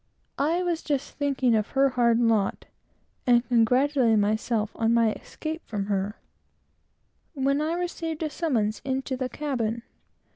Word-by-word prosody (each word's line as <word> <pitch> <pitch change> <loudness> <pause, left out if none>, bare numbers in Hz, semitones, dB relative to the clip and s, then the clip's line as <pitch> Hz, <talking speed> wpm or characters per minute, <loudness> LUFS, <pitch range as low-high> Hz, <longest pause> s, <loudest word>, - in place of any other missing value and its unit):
I 330 +6 +1
was 340 -2 -1
just 285 -2 -2
thinking 275 -4 +1
of 215 0 +1
her 275 0 +3
hard 235 -2 +3
lot, 225 -4 +1 0.6
and 240 0 +4
congratulating 250 0 +3
myself 215 +1 0
upon 230 0 +1
my 230 -2 +4
escape 320 +1 -6
from 205 -3 -3
her, 200 +1 -2 1.2
when 275 +1 +1
I 315 +2 0
received 335 -2 -3
a 310 - -1
summons 225 -12 -1
into 265 0 -2
the 255 0 -3
cabin. 235 -6 -2
255 Hz, 140 wpm, -26 LUFS, 225-290 Hz, 1.2 s, and